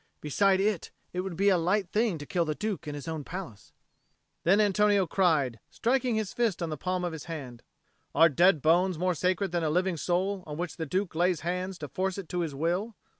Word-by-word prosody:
"Beside 190 +6 +2
it, 200 -3 0 0.2
it 180 - -2
would 185 -1 -3
be 200 +4 +3
a 185 -3 +4
light 185 +2 0
thing 215 -5 +1
to 145 - -8
kill 175 0 0
the 155 -2 -2
Duke 210 -5 -3
in 145 - -4
his 145 +2 -8
own 160 -2 -3
palace." 170 - -8 0.7
Then 190 +5 +4
Antonio 205 -1 +3
cried, 155 - +1
striking 245 0 0
his 215 -3 -2
fist 225 -7 0
on 165 - -2
the - - -2
palm 180 +4 -2
of 175 - -3
his 160 - -7
hand, 135 -8 -7 0.5
"Are 165 +3 +7
dead 170 +1 +3
bones 175 +3 +3
more 180 +2 +1
sacred 185 +2 0
than 175 -1 0
that 160 - 0
living 180 +2 +1
soul 185 +4 -1
on 150 -1 -6
which 175 0 -4
the 160 -2 -3
Duke 185 +4 -1
lays 175 0 +1
hands 180 +2 -3
to 150 - -6
force 185 +7 -2
it 195 -4 -6
to 180 - -2
his 160 -5 -2
will?" 180 +9 -1
180 Hz, 225 wpm, -28 LUFS, 160-195 Hz, 0.7 s, Are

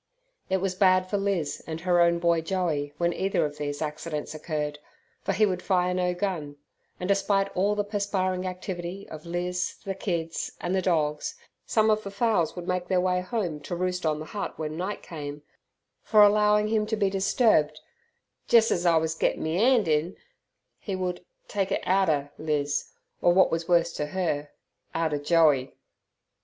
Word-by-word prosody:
It 190 - +2
was 190 0 -1
bad 185 -1 +4
for 205 - -1
Liz 185 -8 -1
and 160 0 -5
her 175 -1 +3
own 170 0 +4
boy 170 -1 +2
Joey 160 -5 -1
when 170 +1 +1
either 195 -3 0
of 150 0 -6
these 145 +1 -3
accidents 150 0 -4
occurred, 150 -1 -3 0.4
for - - -1
he 215 - +3
would 185 -3 -1
fire 180 -2 +1
no 180 -1 0
gun, 175 -7 -3 0.4
and, 180 - -3
despite 195 0 +1
all 200 +3 +2
the 205 - 0
perspiring 195 -3 -1
activity 185 +1 -5
of 155 +1 -9
Liz, 180 +1 -2
the 195 - -2
kids, 170 -4 -3
and 175 - -2
the 190 - +2
dogs, 155 -5 0 0.3
some 220 -1 +3
of 215 0 +2
the 200 - -6
fowls 200 -5 +1
would 175 -1 -7
make 180 -1 -1
their 185 -1 +2
way 180 0 +1
home 185 -6 -3
to 150 +4 -5
roost 180 0 -2
on 155 -2 +1
the 155 - -6
hut 205 +4 -5
when 155 -1 -4
night 185 +5 -4
came 145 -2 -7 0.6
For 215 -1 +5
allowing 210 0 +4
him 215 -1 +1
to 220 - 0
be 200 -3 +1
disturbed 190 -6 +2 0.7
"jes 230 -1 +6
as 175 0 +1
I 165 -1 +5
wus 160 0 0
gettin' 160 - 0
me 160 +3 0
'and 235 -3 +4
in" 155 +4 +1 0.6
he 195 - -4
would 180 -1 -3 0.2
"take 195 -2 -1
it - - 0
outer" 160 -7 +2
Liz, 145 -2 -1 0.3
or, 175 - +5
what 190 - +5
was 165 0 -2
worse 170 -1 +3
to 150 - -2
her, 150 -4 -2 0.5
"outer" 160 -3 0
Joey. 145 -4 +3
180 Hz, 180 wpm, -27 LUFS, 160-195 Hz, 0.7 s, jes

